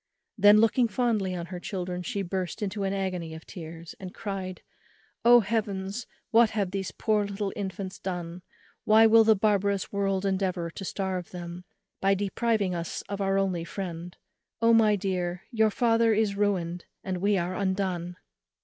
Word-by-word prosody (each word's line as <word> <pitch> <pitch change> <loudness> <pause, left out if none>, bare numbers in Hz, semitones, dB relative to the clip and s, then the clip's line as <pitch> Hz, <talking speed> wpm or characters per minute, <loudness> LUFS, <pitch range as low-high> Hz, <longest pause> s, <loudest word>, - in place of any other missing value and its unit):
Then 205 -1 +7
looking 225 +2 +4
fondly 215 -4 0
on 170 -1 -4
her 180 0 -7
children, 180 -1 -4
she 200 +1 -3
burst 185 +3 -3
into 205 0 -3
an 195 - 0
agony 185 -4 -3
of 160 - -11
tears, 165 -1 -9
and 185 -2 -8
cried, 190 -3 -5 0.6
"Oh 240 0 +8
Heavens; 205 0 -2 0.2
what 230 0 +6
have 200 -4 -1
these 195 -1 -3
poor 215 -2 0
little 200 0 -3
infants 190 -1 -5
done? 175 -1 -5 0.4
why 220 +1 +6
will 225 0 +7
the 220 0 +5
barbarous 200 -1 +1
world 195 -1 0
endeavour 185 -3 -1
to 195 - -8
starve 190 -2 -3
them, 175 0 -8 0.4
by 195 0 +3
depriving 205 0 0
us 170 -1 -4
of 200 0 -3
our 195 0 +1
only 185 -4 0
friend? 175 -1 -6 0.4
O 230 0 +4
my 220 -2 +5
dear, 180 -2 -2
your 220 -2 +3
father 230 0 +3
is 210 -2 +1
ruined, 180 -4 -1 0.2
and 185 -1 -2
we 200 +2 +2
are 180 +1 -2
undone!" 185 -3 -2
195 Hz, 165 wpm, -27 LUFS, 180-210 Hz, 0.6 s, Oh